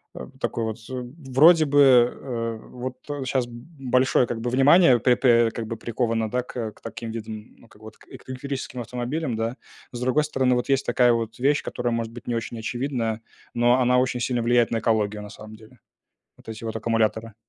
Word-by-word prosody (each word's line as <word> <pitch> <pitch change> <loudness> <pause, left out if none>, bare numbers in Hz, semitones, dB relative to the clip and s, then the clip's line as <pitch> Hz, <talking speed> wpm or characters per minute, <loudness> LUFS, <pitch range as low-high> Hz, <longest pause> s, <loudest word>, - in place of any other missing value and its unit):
э, - - -7
такой 115 - -2
вот, 110 0 -4 0.5
вроде 155 +5 +6
бы, 145 0 +2
э, 120 -3 +2
вот 125 +1 -6 0.3
щас 130 -1 0
б 120 - -13 0.3
большое, 130 -1 +2
как 115 - -4
бы, 120 - -2
внимание 135 +2 +6
пэ 125 +2 +3
пэ 120 -3 +4
как 115 0 -5
бы 115 0 -5
приковано, 115 -1 -1
да, 125 +2 -1
к, 125 - -11
э, 110 -2 -3
к - - -24
таким 115 -1 -7
видам, 110 -1 -8
ну, - - -19
как 105 - -21
бы, - - -14
вот 110 - -12
к - - -21
к - - -14
электрическим 130 -1 -5
автомобилям, 125 +4 -3
да. 115 +2 -2 0.4
С 120 - -5
другой 130 +4 +2
стороны, 130 -4 +1
вот, 125 - -2
есть 135 0 +2
такая 125 -1 +3
вот 115 0 -3
вещь, 140 +3 +2
которая, 120 -1 -2
может 115 -1 -3
быть, 120 - -11
не 120 - -1
очень 115 0 -4
очевидная, 115 -2 -3 0.3
но 120 +1 +3
она 125 0 +3
очень 125 -1 0
сильно 120 0 0
влияет 120 0 +3
на 115 - 0
экологию, 105 -2 0
на 105 - -9
самом 110 +1 -11
деле. 110 +3 -18 0.6
Вот - - -21
эти 110 +1 -8
вот 110 - -4
аккумуляторы. 115 -1 -1
120 Hz, 210 wpm, -24 LUFS, 115-130 Hz, 0.6 s, вроде